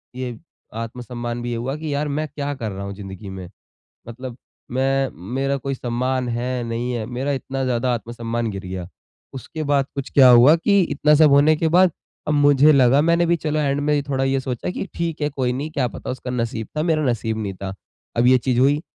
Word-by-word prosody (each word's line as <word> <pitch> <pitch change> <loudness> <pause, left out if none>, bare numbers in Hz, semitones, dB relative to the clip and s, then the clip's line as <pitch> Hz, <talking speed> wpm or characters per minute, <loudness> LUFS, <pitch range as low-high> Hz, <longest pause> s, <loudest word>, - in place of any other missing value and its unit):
ये 125 -2 -5 0.5
आत्म 115 +2 -8
सम्मान 120 -1 -5
भी 120 - -4
ये - - -2
हुआ 125 +4 -3
कि 155 -1 -4
यार 145 +1 -1
मैं 150 +2 -2
क्या 145 0 -4
कर 115 -6 -5
रहा 100 +1 -6
हूँ 100 - -5
ज़िंदगी 95 0 -9
में। 95 -2 -8 0.6
मतलब 125 +1 -8 0.3
मैं 135 +1 +1 0.2
मेरा 135 +1 0
कोई 135 0 -3
सम्मान 125 +1 -1
है 120 +1 -2
नहीं 115 +2 -3
है, 115 -3 -3
मेरा 125 +4 -3
इतना 135 0 -3
ज़्यादा 125 0 0
आत्मसम्मान 115 0 -3
गिर 95 -1 -7
गया। 90 -1 -5 0.5
उसके 145 +4 -6
बाद 140 -2 +2
कुछ 140 -2 -4
क्या 130 -2 +7
हुआ 125 +6 +8
कि 200 +4 +3
इतना 150 -2 +2
सब 155 0 +6
होने 145 +3 +5
के 160 +2 0
बाद 180 +2 +5 0.4
अब 150 - +1
मुझे 145 0 +5
लगा 135 -1 +5
मैंने 170 +2 +3
भी 170 0 +3
चलो 155 -2 -2
एण्ड 145 -1 0
में 150 0 +1
थोड़ा 135 -1 0
ये 135 0 +1
सोचा 130 +1 -4
कि 185 - -4
ठीक 165 -2 -3
है 150 - +1
कोई 130 -3 -1
नहीं 140 +5 -4
क्या 140 -5 0
पता - - -8
उसका 125 0 -6
नसीब 115 -2 -3
था, 155 - +1
मेरा 160 -2 +1
नसीब 115 -3 -1
नहीं 100 -2 -3
था। 95 +1 -6 0.4
अब 120 +1 +4
ये 130 0 +6
चीज़ 125 0 0
हुई। 140 +3 +3
130 Hz, 220 wpm, -21 LUFS, 120-145 Hz, 0.6 s, हुआ